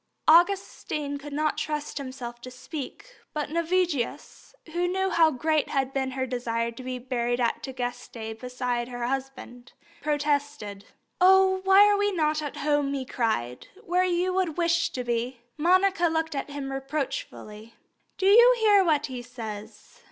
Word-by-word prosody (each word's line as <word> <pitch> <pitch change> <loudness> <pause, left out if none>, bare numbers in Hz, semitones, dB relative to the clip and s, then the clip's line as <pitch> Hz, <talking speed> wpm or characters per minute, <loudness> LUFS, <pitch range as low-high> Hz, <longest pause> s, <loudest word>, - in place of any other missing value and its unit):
Augustine 315 -4 +2
could 290 +1 -9
not 305 +1 0
trust 300 -1 -3
himself 255 -3 -7
to 255 - -8
speak; 300 - -8 0.2
but 295 -1 -3
Navigius, 335 - -2 0.2
who 350 +1 +1
knew 380 +1 0
how 330 -2 +5
great 310 +2 0
had 270 -1 -1
been 265 -1 -1
her 260 0 -2
desire 235 -2 -2
to 235 - -10
be 255 0 -4
buried 245 -1 -2
at 235 -2 0
Tagaste 245 -3 -6
beside 250 -1 -3
her 245 -1 -4
husband, 260 -1 -5 0.3
protested. 290 -9 -1 0.4
"Oh, 380 0 +5
why 385 +1 +7
are 410 0 +3
we 410 0 +1
not 310 -4 0
at 295 -2 -5
home," 290 -1 +1
he 265 -1 -3
cried, 125 - -2 0.2
"where 360 +1 +2
you 365 0 +1
would 365 -4 -1
wish 335 -1 +2
to 250 - -4
be!" 240 +1 -2
Monica 365 +3 +3
looked 320 -1 -1
at 280 0 -4
him 285 -1 -5
reproachfully. 270 -5 -5 0.4
"Do 380 - -1
you 475 +5 +7
hear 415 -3 +5
what 305 -4 +2
he 255 -2 -6
says?" 220 -3 -9
285 Hz, 155 wpm, -26 LUFS, 245-340 Hz, 0.4 s, why